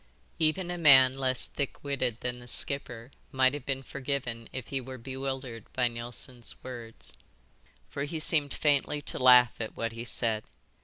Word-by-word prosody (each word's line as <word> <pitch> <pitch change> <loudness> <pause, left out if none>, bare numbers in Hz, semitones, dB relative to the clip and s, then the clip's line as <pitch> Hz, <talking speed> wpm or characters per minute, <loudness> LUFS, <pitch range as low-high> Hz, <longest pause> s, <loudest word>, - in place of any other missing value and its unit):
Even 170 +3 0
a 175 - -4
man 130 -4 +7
less 130 -1 +3
thick 140 -2 -5
witted 130 -5 -2
than 125 0 -3
the 120 - -13
skipper 125 -1 0 0.2
might 130 0 +3
have 145 -3 -7
been 135 -1 -1
forgiven 130 -4 -4
if 130 -2 -6
he 135 -1 -2
were 130 +1 -8
bewildered 130 -1 -6
by 125 -1 +2
Neilson's 120 +1 -5
words. 120 -3 -7 0.7
For 140 - -4
he 160 +2 -5
seemed 150 -2 +2
faintly 145 0 +1
to - - -4
laugh 125 -2 +6
at 110 - -6
what 115 -1 -2
he 115 +1 -7
said. 115 -2 0
130 Hz, 165 wpm, -29 LUFS, 120-140 Hz, 0.7 s, man